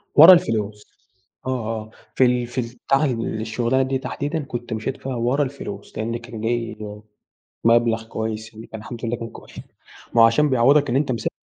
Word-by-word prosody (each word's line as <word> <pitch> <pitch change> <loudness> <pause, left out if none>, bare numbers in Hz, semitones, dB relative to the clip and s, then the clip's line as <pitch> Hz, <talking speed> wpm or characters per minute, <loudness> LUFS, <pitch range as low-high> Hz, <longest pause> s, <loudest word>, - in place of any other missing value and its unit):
ورا 165 +5 +11
الفلوس. 105 - 0 0.6
آه - - 0 0.2
آه. 110 -1 -4 0.2
في 130 - +5
ال 125 -1 +1
في 125 +2 -2
البتاعة 125 +5 0 0.2
الشغلانة 115 +4 0
دي 135 0 -1
تحديدًا 145 +4 -3
كنت 120 -3 -5
مشيت 110 +5 -3
فيها 135 -1 -5
ورا 125 +5 +1
الفلوس، 125 -7 -7
لأن 115 +2 -2
كان 120 -2 -9
جاي 115 0 -1 0.9
مبلغ 115 -1 +3
كويس 110 0 -4
يعني 110 +1 -11
الحمد 115 +2 -7
لله 120 - -1
كان 115 0 -6
كوي - - -13 0.7
ما 115 - +7
هو - - +9
عشان 145 +6 +3
بيعوضك 135 +3 +4
إن 120 - +1
أنتَ 140 -2 +1
مسا 115 - -2
120 Hz, 175 wpm, -22 LUFS, 110-130 Hz, 0.9 s, ورا